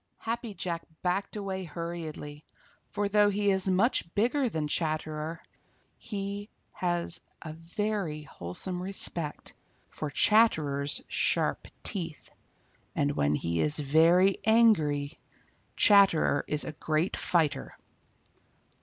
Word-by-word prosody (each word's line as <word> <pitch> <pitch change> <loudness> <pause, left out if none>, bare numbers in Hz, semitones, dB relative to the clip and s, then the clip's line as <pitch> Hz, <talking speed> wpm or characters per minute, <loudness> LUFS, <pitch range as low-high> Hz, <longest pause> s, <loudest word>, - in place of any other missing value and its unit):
Happy 230 -2 -4
Jack 170 -3 -3 0.2
backed 190 +3 -1
away 195 -2 -4
hurriedly, 160 -3 -6 0.5
for 205 0 -1
though 205 0 +4
he 205 0 +1
is 190 0 0
much 190 -1 +1
bigger 245 +5 +2
than 160 -6 -2
Chatterer, 155 0 -2 0.6
he 200 -1 -5 0.2
has 175 -2 -2 0.2
a 155 -2 -6
very 170 -1 -3
wholesome 150 - -5
respect 175 -5 -1 0.4
for 155 - -4
Chatterer's 145 -7 +3
sharp - - 0 0.2
teeth, 170 -6 -2 0.6
and 145 0 +1
when 75 - +1
he 85 +2 -1
is 150 0 +1
very 165 +6 +4
angry, 165 -11 +3 0.6
Chatterer 195 -8 +5
is 150 0 0
a - - -5
great 155 +3 -1
fighter. 150 -5 0
170 Hz, 110 wpm, -29 LUFS, 150-200 Hz, 0.6 s, Chatterer